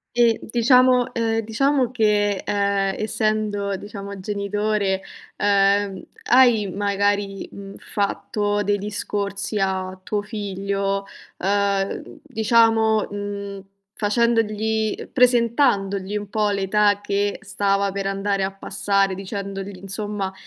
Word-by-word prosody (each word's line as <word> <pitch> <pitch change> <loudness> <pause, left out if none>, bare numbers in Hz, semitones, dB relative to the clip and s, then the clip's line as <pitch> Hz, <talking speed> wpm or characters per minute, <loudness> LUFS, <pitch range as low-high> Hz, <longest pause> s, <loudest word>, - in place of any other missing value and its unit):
E 235 -2 +4
diciamo 250 +1 +4
ehm, 225 -1 0
diciamo 255 +4 +1
che, 210 -4 +1
ehm, 200 -1 +1
essendo 215 -2 -1
diciamo 200 -1 -8
genitore, 200 0 -1 0.4
uhm, 200 -1 +2 0.3
hai 240 -5 +5
magari, 200 0 -1
mhmm, 195 0 -9
fatto 205 0 -1
dei 205 0 +1
discorsi 200 0 -3
a 190 -1 -2
tuo 205 +2 -1
figlio, 195 -1 -2 0.3
uhm, 200 0 -1
diciamo, 225 -3 +3
mhmm, 200 -1 -5 0.4
facendogli 220 -1 0
presentandogli 230 -6 +2
un 205 -1 -4
po' 210 -1 +1
l'età 205 +1 +2
che 205 0 -1
stava 200 -1 0
per 195 0 -4
andare 195 0 -1
a 190 - -1
passare, 195 0 0
dicendogli 195 0 -6
insomma, 200 0 -4
205 Hz, 105 wpm, -22 LUFS, 195-215 Hz, 0.4 s, hai